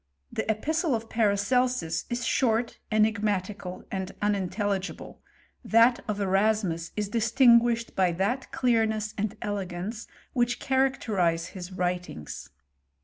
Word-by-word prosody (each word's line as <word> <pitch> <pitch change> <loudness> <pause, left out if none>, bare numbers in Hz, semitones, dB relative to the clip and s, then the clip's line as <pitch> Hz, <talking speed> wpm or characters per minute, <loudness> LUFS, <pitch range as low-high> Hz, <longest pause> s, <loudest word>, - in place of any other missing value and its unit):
The - - -3
epistle 305 - +1
of 225 0 -5
Paracelsus 215 -4 +1
i* - - +1
short, 235 -1 0
enigmatical, 205 -3 0
and 190 -1 -3
unintelligible; 200 -1 -2 0.4
that 230 +2 +5
of 210 -1 -2
Eras 205 +3 +2
mus 170 -2 -3
is 210 -1 0
distinguished 235 0 +4
by 185 -2 +3
that 205 +9 -1
clearness 220 -3 +1
and 210 0 -3
el^ance 205 +1 -4 0.3
which 245 -1 +1
characterize 215 -11 +1
his 185 -1 -8
writings. 175 - -4
210 Hz, 110 wpm, -27 LUFS, 190-235 Hz, 0.4 s, that